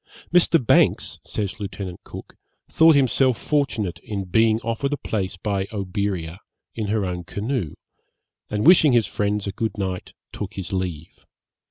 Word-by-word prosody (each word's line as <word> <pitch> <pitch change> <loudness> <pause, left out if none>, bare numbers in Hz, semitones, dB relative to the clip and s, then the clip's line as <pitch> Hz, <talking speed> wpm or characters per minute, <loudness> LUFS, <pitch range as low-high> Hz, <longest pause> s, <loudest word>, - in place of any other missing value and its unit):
Mr. 175 -1 +5
Banks, - - +3
says 105 +1 -4
Lieut. 100 -2 -5 0.3
Cook, - - -10 0.3
thought 160 -1 +5
himself 130 -2 +3
fortunate 110 - -1
in 100 -1 -4
being 110 +4 +3
offered 115 +5 -2
a - - -1
place 95 -7 -3
by 100 0 -2
Oberea, 95 -4 -3 0.3
in 110 -2 -3
her 105 -1 0
own 90 -1 -4
canoe, 100 - -3 0.7
and 105 0 -1
wishing 160 -5 +7
his 115 -3 +4
friends 105 0 -1
a 100 - -2
good 110 +3 -3
night, 95 -2 -4 0.2
took - - -6
his 95 -1 -5
leave. 90 -4 -4
105 Hz, 150 wpm, -23 LUFS, 95-115 Hz, 0.7 s, wishing